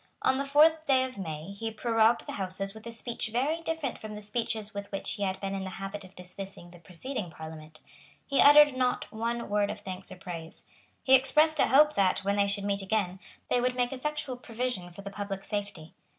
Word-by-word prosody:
On 265 - +3
the 275 - -1
fourth 315 +3 +5
day 260 -2 +4
of 255 -5 -6
May 160 0 -5
he 225 +3 -4
prorogued 225 +1 +2
the - - -5
Houses 195 0 -3
with 220 +1 -11
a - - -5
speech 230 0 -3
very 275 +9 0
different 320 -6 -3
from 215 -1 -7
the 210 - -7
speeches 220 0 -2
with 200 0 -6
which 195 - -3
he 205 - -5
had 190 -1 -1
been 195 0 -3
in 195 -1 -3
the 190 - -4
habit 195 +2 -6
of 185 +1 -15
dismissing 180 -1 -6
the 175 - -14
preceding 185 +4 -5
Parliament. 155 -1 -10 0.4
He 280 - +3
uttered 290 -1 +8
not 250 -1 0
one 235 +1 -2
word 205 0 +1
of 210 - -5
thanks 190 -1 -6
or - - -7
praise. 170 -3 -8 0.4
He 265 - +4
expressed 300 +4 +5
a - - +5
hope 300 +3 +6
that, 190 -1 +2
when 200 +1 0
they 200 0 +3
should 200 0 -1
meet 200 0 0
again, 190 -2 -1 0.3
they 245 - +2
would 250 0 +1
make 245 +1 0
effectual 285 -1 -3
provision 235 -6 -4
for 175 +3 -11
the 200 - -6
public 200 -1 -5
safety. 200 -7 -5
210 Hz, 220 wpm, -29 LUFS, 195-255 Hz, 0.4 s, uttered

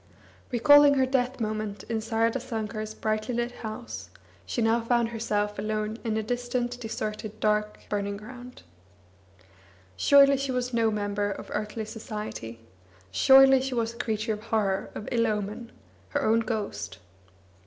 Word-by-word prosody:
Recalling 290 +3 +7
her 265 -1 +3
death 260 0 0
moment 215 -2 -3
in 225 -1 -2
Saradasankar's 225 -1 -2
brightly 215 +3 -1
lit 240 +1 -1
house, 220 0 -7 0.4
she - - -3
now 230 +1 +3
found 235 0 +1
herself 210 -3 -2
alone 215 +1 -2
in 220 -2 -1
a 220 - -1
distant, 245 +1 -2
deserted, 215 -2 -5
dark 210 0 0
burning. 200 -1 -2
ground. 245 +3 -11 1.3
Surely 275 - +6
she 275 0 -2
was 250 0 -2
no 230 -1 +3
member 205 -1 -1
of 200 - -7
earthly 215 +1 -3
society! 210 - -6 0.5
Surely 265 - +7
she 265 -1 -3
was 230 -1 -1
a - - -14
creature 220 -1 -1
of 210 - -6
horror, 210 -4 0
of 215 - -6
ill 230 -1 +2
omen, 210 +2 -3 0.4
her - - -1
own 225 +1 +4
ghost! 215 - -3
225 Hz, 145 wpm, -27 LUFS, 210-245 Hz, 1.3 s, Recalling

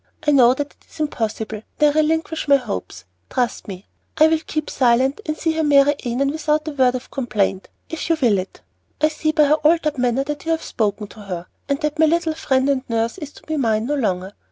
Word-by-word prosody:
I - - +6
know 255 -3 +6
that 290 +1 -4
it - - -31
is - - -16
impossible, 220 -7 -3 0.2
and 300 -1 +5
I - - -7
relinquish 320 0 0
my 280 - +6
hopes. 95 - -4 0.2
Trust 245 -3 -2
me. 190 -1 -8 0.3
I 310 - +7
will 320 0 +2
keep 310 -1 -2
silent 260 - +2
and 305 0 -2
see 325 - 0
her 320 0 -1
marry 290 -1 +5
Annon 255 +3 0
without 305 0 -1
a - - -2
word 260 -3 +2
of 255 - -7
complaint, 210 -7 -1 0.2
if 325 +1 -5
you 330 - +3
will 225 -8 +3
it. 185 - -8 0.4
I 305 - +3
see 310 0 -1
by 310 -1 +4
her 300 +1 +4
altered 305 -2 +2
manner 250 +2 +1
that 295 +1 -5
you 330 - +1
have 320 - -3
spoken 210 -2 -2
to 220 - -14
her, 180 -4 -6 0.2
and 280 0 0
that 300 0 -2
my 320 - +6
little 330 0 +1
friend 270 -4 0
and 275 -2 +1
nurse 230 0 -1
is 300 -2 -7
to - - -16
be 315 0 -3
mine 225 -4 +1
no 290 - -1
longer. 195 -8 -1
275 Hz, 230 wpm, -21 LUFS, 230-310 Hz, 0.4 s, I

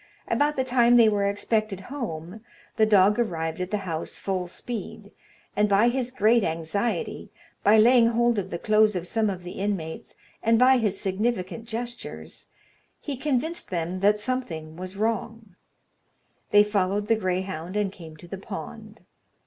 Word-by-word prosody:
About 295 +1 +1
the 260 - +1
time 245 -1 +4
they 230 -2 +7
were 200 -1 +1
expected 205 -1 -1
home, 200 - -6 0.3
the 220 - +3
dog 205 +1 +4
arrived 165 -7 -2
at 180 - -3
the 210 - 0
house 165 -3 -4
full 185 -2 -2
speed, 205 +1 -7 0.4
and 210 0 +2
by 205 +4 +4
his 250 0 -1
great 230 -2 +3
anxiety, 165 - -2 0.3
by 210 +2 +6
laying 235 +1 +6
hold 235 -1 +2
of 195 - -5
the 170 - -3
clothes 215 +1 +3
of 175 -1 -3
some 215 +3 0
of 185 -2 -5
the 175 - -7
inmates, 190 -6 -4 0.3
and 230 0 +3
by 255 +2 +5
his 205 -4 0
significant 210 +2 -2
gestures, 235 +1 -6 0.5
he 285 - -5
convinced 300 +5 -2
them 175 0 -3
that 205 +2 +3
something 175 -10 -4
was 185 +2 -7
wrong. 225 -2 -3 0.9
They 205 0 +6
followed 205 0 0
the 225 - +4
greyhound, 185 -3 -3
and 205 -2 0
came 160 -5 -12
to 175 - -13
the 195 +2 -7
pond. - - -8
210 Hz, 160 wpm, -25 LUFS, 185-235 Hz, 0.9 s, they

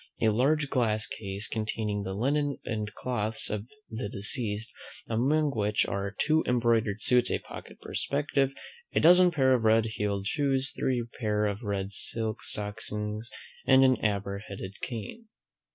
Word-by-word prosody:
A 110 - +4
large 140 +6 +2
glass 110 -5 +2
case, 100 0 -3
containing 110 -2 -2
the 95 -1 -4
linen 140 +5 +1
and 105 -2 -3
clothes 110 -3 -3
of 105 +1 -3 0.2
the 110 -2 -4
deceased; 105 +1 -2 0.4
among 140 +7 +2
which 105 -3 +1
are, 100 0 -2
two 160 +1 +3
embroidered 115 -4 +2
suits, 125 -1 +4
a - - +1
pocket - - -11
perspective, 140 -1 0 0.4
a - - +5
dozen 180 +2 +7
pair 135 -6 +3
of 125 - +2
RED 110 0 +4
HEELED 105 -3 -2
SHOES, 135 +1 +1
three 125 -3 0
pair 105 -2 +1
of 100 +1 -2
RED 100 -3 -2
SILK 110 +1 -4
STOCKINGS, 105 +1 -4 0.4
and 135 0 +7
an 130 -2 +5
amber 100 -2 -1
headed 100 -2 -7
cane. 125 - -6
110 Hz, 150 wpm, -29 LUFS, 105-130 Hz, 0.4 s, dozen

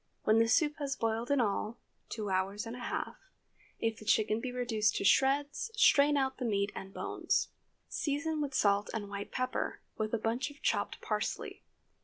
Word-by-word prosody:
When 215 +1 +4
the 230 - +4
soup 295 +5 +3
has 280 -2 -2
boiled 225 +1 -1
in 285 -1 +3
all, 215 0 0 0.3
two 210 -3 -3
hours 195 +3 0
and 230 +1 -6
a - - -8
half, 245 - -3 0.6
if 225 -1 -1
the - - -10
chicken 215 0 +2
be 255 - -3
reduced 225 -4 +1
to - - -1
shreds, 285 - +3
strain 290 -9 +5
out 265 -1 0
the - - -3
meat 200 -2 +1
and 195 - -7
bones. - - -1 0.4
Season 305 +1 -1
with 280 -2 -2
salt 200 -2 +3
and 205 -2 -4
white 200 0 -5
pepper, 255 0 -2 0.2
with 215 0 -1
a - - +1
bunch 230 +6 -1
of 290 0 -14
chopped - - 0
parsley. - - -3
230 Hz, 185 wpm, -32 LUFS, 210-275 Hz, 0.6 s, strain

